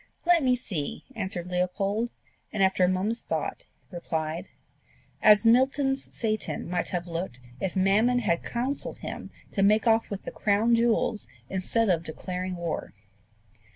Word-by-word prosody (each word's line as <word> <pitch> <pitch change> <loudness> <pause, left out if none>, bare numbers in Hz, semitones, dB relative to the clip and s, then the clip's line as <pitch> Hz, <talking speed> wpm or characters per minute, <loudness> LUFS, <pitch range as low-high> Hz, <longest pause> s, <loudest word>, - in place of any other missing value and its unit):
"Let 345 -1 +5
me 255 -2 +3
see," 185 - -4
answered 190 -4 -4
Leopold; 195 +5 0 0.4
and 205 -2 +1
after 190 -1 +3
a - - +6
moment's 195 +6 0
thought - - -3 0.3
replied, 160 -2 -3 0.7
"As 210 +1 +6
Milton's 270 +3 +3
Satan 215 -6 -2
might 175 +1 -1
have 175 -1 -2
looked 165 -7 -4 0.2
if 190 - -2
Mammon 205 +6 +3
had 195 -8 +1
counselled 255 +4 -3
him - - -6 0.2
to 195 - -1
make 210 +3 +4
off 225 -1 +3
with 200 -1 -5
the - - -6
crown 215 +3 +2
jewels 235 -1 +2 0.2
instead 195 +4 +1
of 175 -4 +3
declaring 180 +3 -4
war." 170 -9 -4
200 Hz, 145 wpm, -27 LUFS, 180-235 Hz, 0.7 s, a